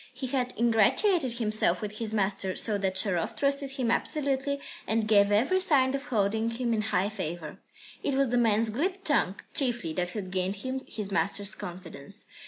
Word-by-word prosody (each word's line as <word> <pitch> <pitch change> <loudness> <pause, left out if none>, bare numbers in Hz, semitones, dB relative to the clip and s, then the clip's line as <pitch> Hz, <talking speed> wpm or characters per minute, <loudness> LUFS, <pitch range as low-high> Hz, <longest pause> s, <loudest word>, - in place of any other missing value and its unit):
He 260 +1 -5
had 255 -1 -2
ingratiated 245 - +3
himself 215 -6 +1
with 210 0 -6
his 225 -2 -2
master, 195 -3 -1
so 210 -3 +1
that 190 -1 -1
Sharov 190 -3 0
trusted 280 -1 0
him 255 -4 0
absolutely 280 -1 0 0.3
and 220 0 0
gave 205 -1 +4
every 260 - +3
sign 275 -8 +3
of 275 0 -3
holding 220 -1 0
him 235 0 -1
in 215 - +1
high 205 -2 0
favour. 170 -6 -6 0.4
It 280 - -1
was 275 -2 +2
the 245 - +1
man's 225 -1 +2
glib 370 - -2
tongue, 275 - +2 0.2
chiefly, 240 - +1
that 175 +1 0
had 185 -1 -6
gained 185 +1 -1
him 260 +6 -4
his 205 -2 -5
master's 200 +4 0
confidence. 175 -5 -9
220 Hz, 180 wpm, -28 LUFS, 195-265 Hz, 0.4 s, gave